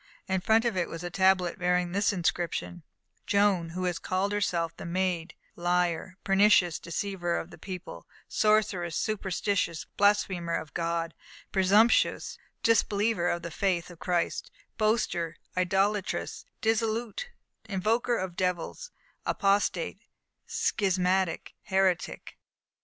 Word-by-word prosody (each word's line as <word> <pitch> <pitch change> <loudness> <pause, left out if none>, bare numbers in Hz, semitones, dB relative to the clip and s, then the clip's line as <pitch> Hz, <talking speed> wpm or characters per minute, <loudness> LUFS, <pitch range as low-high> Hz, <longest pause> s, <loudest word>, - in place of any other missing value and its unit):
In 190 -1 0
front 225 +4 +3
of 235 -4 +1
it 180 -2 0
was 165 +1 -6
a 175 - -4
tablet 185 -1 +2
bearing 180 0 +1
this 200 +3 +2
inscription: 175 -1 -2 0.5
_Joan, 195 -5 +2
who 185 +1 -3
has 180 -2 -1
called 190 +2 -1
herself 170 -5 0
The - - -9
Maid 175 -1 -1 0.2
liar, 175 +1 0
pernicious, 195 -3 +4
deceiver 175 0 -2
of 165 - -5
the - - -13
people, 185 -2 -8 0.2
sorceress, 210 -6 +2
superstitious, 195 -4 -1
blasphemer 190 -4 +2
of 155 - -5
God, 165 -1 -1 0.4
presumptuous, 205 +5 +3 0.2
disbeliever 210 -4 +2
of 170 -1 -2
the 170 - -5
faith 180 -3 0
of 170 - -14
Christ, 175 -2 -1 0.3
boaster, 215 -7 0 0.2
idolatress, 195 +2 0 0.2
dissolute, 225 - 0 0.4
invoker 225 +5 +1
of 185 -2 -4
devils, 180 - -2 0.3
apostate, 205 - +1 0.5
schismatic, 185 -3 0
heretic. 190 -2 0
185 Hz, 115 wpm, -28 LUFS, 175-205 Hz, 0.5 s, pernicious